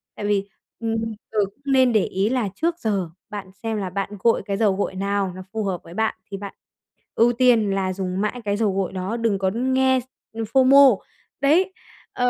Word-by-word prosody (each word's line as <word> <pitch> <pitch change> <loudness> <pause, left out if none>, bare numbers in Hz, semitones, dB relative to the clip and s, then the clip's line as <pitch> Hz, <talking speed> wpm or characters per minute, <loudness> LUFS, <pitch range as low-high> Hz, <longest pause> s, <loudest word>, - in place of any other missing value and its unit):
tại 205 - -5
vì, 200 -1 0 0.3
ừm, 225 -1 -1 0.4
giờ 215 - 0
cũng 200 +8 -17
nên 255 -2 +4
để 215 - +3
ý 195 +3 0
là 245 -6 0
trước 335 +1 -1
giờ 200 -6 -1 0.2
bạn 200 -3 -7
xem 225 -1 -1
là 195 -3 -3
bạn 195 +1 -3
gội 230 +4 +3
cái 200 -2 -2
dầu 210 -3 +2
gội 190 -1 -2
nào 200 0 -1
nó 185 - -7
phù 220 -1 -1
hợp 190 -3 -3
với 170 - -12
bạn 220 +2 0 0.2
thì 195 - -4
bạn 200 0 -7 0.6
ưu 240 +2 +4
tiên 235 -4 +4
là 190 -1 0
dùng 185 0 -3
mãi 215 +4 -2
cái 205 0 0
dầu 215 -3 +1
gội 190 -1 -2
đó, 190 +5 -3
đừng 225 -4 0
có 190 -1 +1
nghe 260 +1 +2
s - - -8 0.3
ừm, 225 - -3
FOMO. 265 -1 +6 0.4
Đấy, 340 +7 +3 0.4
ờ, 250 0 +1
210 Hz, 215 wpm, -23 LUFS, 195-245 Hz, 0.6 s, FOMO